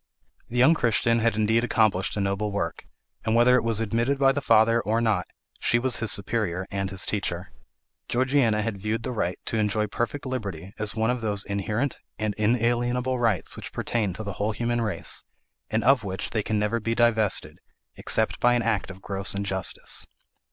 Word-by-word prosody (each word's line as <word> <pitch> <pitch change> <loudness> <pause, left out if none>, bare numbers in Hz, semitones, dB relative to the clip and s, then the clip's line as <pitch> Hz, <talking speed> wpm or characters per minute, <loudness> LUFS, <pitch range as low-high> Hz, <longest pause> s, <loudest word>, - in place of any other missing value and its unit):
The 125 - -4
young 130 +6 +6
Christian 115 -4 +2
had 115 -1 +1
indeed 110 +2 +2
accomplished 110 -6 +1
a - - 0
noble 100 +2 -1
work; 100 - -3 0.4
and 110 +1 +1
whether 120 +2 +6
it 125 - +2
was 115 -2 +1
admitted 115 +5 0
by 135 0 +4
the 140 +1 -2
father, 115 -2 +4
or 110 +1 0
not, 110 -6 +1 0.3
she 120 - +2
was 125 0 +2
his 110 -3 +1
superior 95 -3 -1
and 95 -1 -2
his 95 0 +1
teacher. 90 -3 -2 0.6
Georgiana 125 -4 +2
had 110 -3 -3
viewed 110 +2 -2
the 130 - -3
right 90 -6 -2
to 115 - -2
enjoy 105 0 +1
perfect 120 +6 -3
liberty 100 -8 -5
as 105 -1 -2
one 110 +1 +1
of 125 -1 -3
those 105 -3 -2
inherent 105 +7 -2 0.2
and 110 -1 -1
inalienable 120 +3 +1
rights 115 -7 0
which - - -8
pertain 110 -5 -1
to 110 - -6
the 100 -2 -4
whole 105 +2 -1
human 120 +2 -1
race, 105 -7 -1 0.5
and 110 0 0
of 130 -3 +4
which 95 0 -4
they 110 - 0
can 110 +1 -1
never 105 +3 0
be 115 +1 -2
divested, 115 -3 +1 0.4
except - - 0
by 120 0 +4
an 120 - +1
act 110 -5 0
of 95 0 -11
gross 100 -2 -1
injustice. 95 -2 0
110 Hz, 190 wpm, -25 LUFS, 100-120 Hz, 0.6 s, young